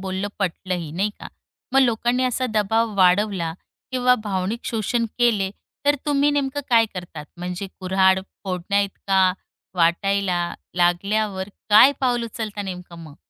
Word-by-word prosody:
बोलणं 190 +1 -3
पटलंही 180 -3 -3
नाही 200 +5 0
का? - - -8 0.5
मग 270 - +6
लोकांनी 240 +1 +2
असा 255 +1 0
दबाव 220 +1 +1
वाढवला 185 -2 +3 0.4
किंवा 250 0 +4
भावनिक 200 +3 -2
शोषण 230 +1 -1
केले, 215 -6 +2 0.4
तर 290 - +5
तुम्ही 290 0 +3
नेमकं 285 0 -1
काय 225 -1 +5
करतात? 175 -4 -7
म्हणजे 180 +2 -5
कुऱ्हाड 190 0 +3 0.2
फोडण्या 190 +2 0
इतका 195 -1 +1 0.4
वाटायला 175 +1 +1 0.2
लागल्यावर 190 +3 0 0.2
काय 235 +7 +8
पाऊल 245 -3 +1
उचलता 215 -2 -5
नेमकं 180 -3 -8
मग? 150 -2 -13
200 Hz, 130 wpm, -22 LUFS, 185-230 Hz, 0.5 s, काय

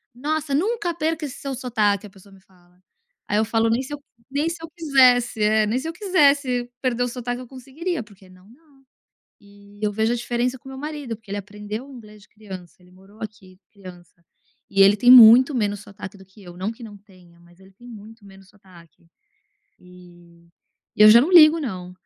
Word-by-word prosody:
"Nossa 290 +2 -3
nunca 375 +2 -1
perca 320 -1 -3
esse 275 - -9
seu 275 -1 -5
sotaque" 215 -5 -1
a - - -16
pessoa 195 +1 -20
me 190 - -19
fala. 180 -1 -28 0.5
Aí 205 - -1
eu 220 - +1
falo: 225 0 0
"Nem 230 +3 0
se 280 - -9
eu 290 - -6 0.3
nem 290 +4 -1
se 335 - -6
eu - - -7
quisesse" 255 -8 +2
É, 215 0 +2
nem 225 +4 -1
se 295 - -7
eu 330 - -5
quisesse 280 - +1
perder 245 -2 -1
o 245 - -1
sotaque 245 0 -5
eu 250 - -11
conseguiria 275 +6 -6
porque 200 -3 -20
não, 185 +2 -20
não. 275 +1 -24 0.6
E 205 0 -19
eu 210 - -1
vejo 220 +3 0
a - - -1
diferença 240 +2 -3
com 265 - -14
o - - -10
meu 265 - -9
marido 295 -5 -6
porque 220 -2 -24
ele 205 - -3
aprendeu 210 +5 -8
inglês 215 -5 -14
de - - -24
criança, 190 -5 -12
ele 180 0 -22
morou 195 +3 -20
aqui 195 -4 -11
criança, 180 -3 -15 0.5
e 195 - +1
ele 200 +1 +6
tem 245 +4 +5
muito 250 +3 +8
menos 205 -3 -2
sotaque 200 -1 -11
do 190 - -16
que 190 +3 -20
eu, 175 -1 -13
não 195 +4 -3
que 235 +1 -13
não 205 -2 -11
tenha, 185 -4 -22
mas 175 +1 -23
ele 190 0 -19
tem 240 +6 -18
muito 220 0 -14
menos 195 -1 -17
sotaque. 175 -5 -21 0.7
E 175 -1 -19 0.5
e - - +4
eu 215 - +9
já 235 +2 +8
não 335 +8 -1
ligo 325 -1 +7
não. 185 -9 -6
220 Hz, 210 wpm, -22 LUFS, 195-260 Hz, 0.7 s, eu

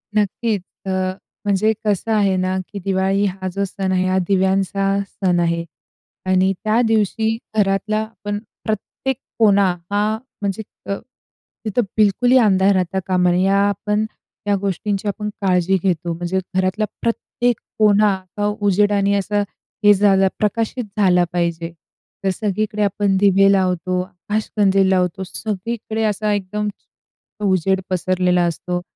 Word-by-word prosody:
नक्कीच. 210 0 0 0.2
अ, 190 - -2 0.5
म्हणजे 205 +2 +2
कसं 210 +2 0
आहे 200 -3 +3
ना 185 0 0
की 205 - -5
दिवाळी 195 +1 +1
हा 190 -1 -3
जो 200 - -1
सण 190 0 -3
आहे, 185 0 +2
हा 185 0 +1
दिव्यांचा 195 +1 +1
सण 180 -3 0
आहे. 170 0 +1 0.6
आणि 185 +1 +3
त्या 220 +2 +3
दिवशी 220 +1 +1 0.2
घरातला 205 +1 +1
आपण 205 -1 -5 0.3
प्रत्येक 220 +5 -3 0.2
कोना 200 -4 +5 0.2
हा 210 +2 +1 0.2
म्हणजे 200 +1 -2 0.3
अ, - - +1 0.7
तिथं 215 +3 +1 0.2
बिलकुलही 240 +5 +4
अंधार 200 -4 +4
राहता 185 +1 0
कामा 180 -1 +3
नये, 180 +1 +2
ह्या 195 +1 +3
आपण 210 +2 -1 0.4
या 205 - +3
गोष्टींची 200 +1 -2
आपण 210 +1 -2
काळजी 185 -1 +2
घेतो 175 -3 0
म्हणजे 175 +3 -2 0.2
घरातला 190 +3 +1 0.2
प्रत्येक 235 0 -1 0.2
कोना 210 -1 +5 0.2
अ, 205 - 0 0.2
उजेडाने 200 0 +3
असा 205 +1 0 0.4
हे 205 - +9
झालं 195 -1 +4
प्रकाशित 225 +3 0
झाला 180 -3 +4
पाहिजे. 170 -1 -1 0.5
तर 195 - +2
सगळीकडे 210 +2 -2
आपण 200 0 +1
दिवे 195 0 +5
लावतो, 185 -2 +1
आकाशकंदील 195 +1 0
लावतो. 185 0 +1
सगळीकडे 220 +3 -4
असा 215 0 0
एकदम 205 +1 -2 0.7
अ, - - -6
उजेड 190 0 +2
पसरलेला 180 -1 +1
असतो. 175 +1 -2
195 Hz, 135 wpm, -20 LUFS, 185-210 Hz, 0.7 s, हे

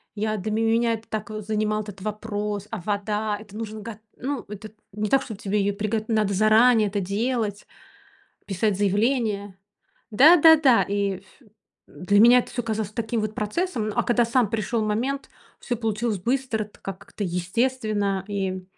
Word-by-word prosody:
Я 215 +1 -1
для 210 +2 -4
меня 225 +1 +2
это 225 0 -7
так, 215 -1 -4
э, 215 0 -5
занимал 215 0 -1
этот 200 -2 -10
вопрос. 210 -1 -4
А 225 - -4
вода? 210 +2 -2
Это 210 -1 -13
нужно 220 -1 -6
го 220 0 -8 0.2
ну, 270 0 -3
это 210 0 -8 0.2
не 210 +1 -2
так, 270 - +4
чтоб 220 -5 -8
тебе 205 +1 -1
её 200 +1 0
приго 215 +1 -1
надо 215 -3 +1
заранее 215 +2 +5
это 205 +1 -2
делать, 210 +2 -2 0.8
писать 200 +1 0
заявление. 205 -1 0 0.5
Да, 290 +11 +7
да, 320 0 +8
да, 270 -6 +4
и 200 -1 -1
ф 190 - -22 0.6
для 200 +3 +1
меня 240 +3 +8
это 245 - -2
всё 245 - -2
казалось 220 -2 -3
таким 225 +1 -2
вот 215 0 -3
процессом, 220 - -2
но, - - -3
а 240 - +3
когда 240 0 +3
сам 235 -1 +2
пришёл 225 +1 -1
момент, 245 +7 -2 0.3
всё 245 - -3
получилось 220 -1 -1
быстро 245 -1 -1
так, 210 - -20 0.2
как-то 205 - -7
естественно, 200 +1 -1
и 190 -2 -3
215 Hz, 175 wpm, -24 LUFS, 205-230 Hz, 0.8 s, да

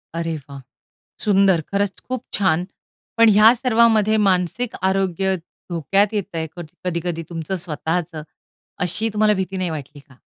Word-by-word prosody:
अरे 165 -1 -2
वाह! 140 -1 -9 0.6
सुंदर, 195 -4 +4
खरंच 200 -1 -1
खूप 255 -1 -5
छान. 180 -3 +1 0.5
पण 230 -1 +7
ह्या 215 +3 +7
सर्वामध्ये 225 -3 +3
मानसिक 185 +6 -1
आरोग्य 190 0 +1 0.3
धोक्यात 195 +5 +1
येत 205 -3 -3
आहे. 160 -1 -2
कध 175 -2 -7 0.2
कधी-कधी 170 -1 -2
तुमचं 165 +2 -4
स्वतःचं. 160 +1 -3 0.6
अशी 220 +6 -2
तुम्हाला 215 0 +3
भीती 190 0 -3
नाही 185 -1 -1
वाटली 145 -2 -7
का? 135 -2 -21
190 Hz, 140 wpm, -21 LUFS, 165-210 Hz, 0.6 s, पण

